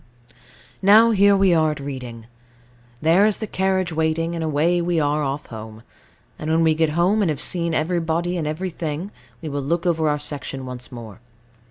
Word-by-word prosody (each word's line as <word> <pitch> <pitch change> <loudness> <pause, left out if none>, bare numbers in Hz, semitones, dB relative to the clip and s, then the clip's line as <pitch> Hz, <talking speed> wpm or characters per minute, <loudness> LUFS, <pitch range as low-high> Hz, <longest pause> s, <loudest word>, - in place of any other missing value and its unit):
Now 215 +4 +6
here 200 -1 +4
we 195 -2 +4
are 160 -1 +3
at 150 - -4
Reading. 125 -5 -7 0.8
There 165 +5 +5
is 215 - 0
the 220 - -4
carriage 190 -3 -1
waiting, 160 +1 0
and 165 -1 -3
away 160 +3 +1
we 170 -1 0
are 150 0 +1
off 140 0 -3
home; 110 -1 -10 0.6
and 155 - -4
when 165 +1 +3
we 160 -1 +4
get 160 0 +1
home, 190 +5 +3
and 190 - +2
have 150 -3 -2
seen 170 0 -1
everybody 170 +1 -1
and 160 -4 -2
everything, 165 +1 -4 0.3
we 155 - -4
will 145 0 -3
look 165 +6 -1
over 160 -3 +1
our 150 - +1
section 145 -2 -6
once 125 +1 -8
more. 115 -4 -10
160 Hz, 185 wpm, -22 LUFS, 145-175 Hz, 0.8 s, Now